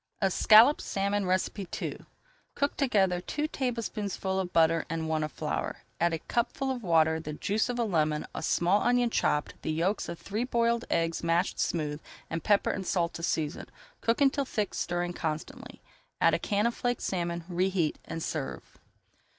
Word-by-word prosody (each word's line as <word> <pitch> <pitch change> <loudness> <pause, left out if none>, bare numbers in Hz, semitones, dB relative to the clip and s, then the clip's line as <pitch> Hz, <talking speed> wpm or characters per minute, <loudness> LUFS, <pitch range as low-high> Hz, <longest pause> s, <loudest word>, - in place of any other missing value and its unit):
ESCALLOPED 220 +7 +6
SALMON 200 -1 -1 0.5
II - - -4 0.6
Cook 285 0 0
together 195 -9 +2
two 300 +10 -2
tablespoonfuls 210 -8 -2
of 180 -1 -5
butter 165 0 +4
and 165 0 -2
one 160 -1 0
of 155 - -3
flour. - - -3 0.2
Add 170 - +3
a - - 0
cupful 240 - -1
of 255 -2 -4
water, 160 -4 +3
the 155 -1 -6
juice 210 +9 0
of 245 - -2
a 240 - +1
lemon, 155 -7 0
a - - -4
small 175 +5 +2
onion 245 -1 +2
chopped, 150 -7 0
the - - -4
yolks 175 +6 0
of 170 - -5
three 210 +7 -3
boiled 235 -1 +1
eggs 165 0 0
mashed 170 +3 +1
smooth, 150 -2 -1 0.3
and 165 - -3
pepper 205 -2 +3
and 190 -2 -4
salt 170 -2 0
to - - -7
season. 160 -1 -2 0.3
Cook 230 +4 +1
until 280 0 +3
thick, 215 -6 -2
stirring 175 0 -2
constantly. 160 -2 -5 0.4
Add - - +4
a - - +2
can 205 0 0
of 235 - +2
flaked 245 0 -2
salmon, 170 -2 -2
reheat, 180 -2 0
and 165 - -5
serve. 145 -4 -5
185 Hz, 170 wpm, -29 LUFS, 165-230 Hz, 0.6 s, ESCALLOPED